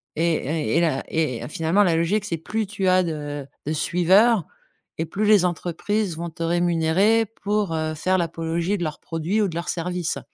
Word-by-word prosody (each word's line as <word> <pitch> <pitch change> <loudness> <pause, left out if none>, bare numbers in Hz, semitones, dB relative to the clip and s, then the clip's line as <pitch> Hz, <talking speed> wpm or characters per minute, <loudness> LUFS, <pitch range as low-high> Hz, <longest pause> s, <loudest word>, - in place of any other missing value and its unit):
Et 165 +1 +2
et 155 +2 -1
et 170 - +4
la 155 -5 +1
et 155 -7 -1
finalement, 165 +6 +2
la 175 -4 +2
logique, 185 +6 +1
c'est 170 -5 -2
plus 215 +7 -3
tu 195 -1 -2
as 185 0 +4
de 145 -4 -4 0.2
de 155 - -1
suiveurs 185 +5 +3 0.5
et 160 - -1
plus 200 +6 -2
les 205 -4 +5
entreprises 180 +2 -2
vont 170 +1 -4
te 165 +1 -6
rémunérer 175 +6 +2 0.2
pour, 205 -4 0
heu, 155 0 -1
faire 185 +4 +1
l'apologie 170 +2 -1
de 175 - -3
leurs 155 -2 -4
produits 165 +6 -1
ou 205 - +2
de 170 - -6
leurs 170 +1 -4
services. 175 -1 -2
170 Hz, 190 wpm, -23 LUFS, 160-195 Hz, 0.5 s, les